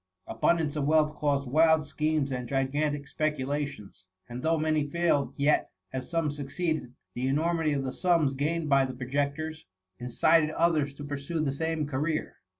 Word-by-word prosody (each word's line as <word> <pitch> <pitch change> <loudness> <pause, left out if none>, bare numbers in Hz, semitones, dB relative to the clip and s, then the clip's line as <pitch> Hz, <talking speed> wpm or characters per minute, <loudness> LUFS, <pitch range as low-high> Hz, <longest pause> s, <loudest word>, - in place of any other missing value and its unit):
Abundance 150 +7 +1
of 145 -2 -1
wealth 155 0 +3
caused 145 -2 0
wild 160 +3 +4
schemes 150 -1 0
and 125 -2 -4
gigantic 140 +2 -1
speculations; 140 -10 -3 0.2
and 120 +1 -6
though 165 +3 +2
many 155 -1 0
failed, 165 -3 +1
yet, 145 +2 +2 0.2
as 130 -1 -4
some 165 -3 0
succeeded, 145 -1 -3 0.2
the 125 +2 -2
enormity 160 +2 +1
of 140 -1 -1
the 130 - -3
sums 170 -6 +2
gained 155 +4 -1
by 140 -2 +4
the 130 -1 -4
projectors, 145 +5 -3 0.3
indted 150 +6 +3
others 160 -4 +2
to 145 - -8
pur 145 0 -4
sue 150 +4 -4
the 145 -3 0
same 160 +2 -1
career. 150 +3 -2
145 Hz, 160 wpm, -28 LUFS, 135-155 Hz, 0.3 s, wild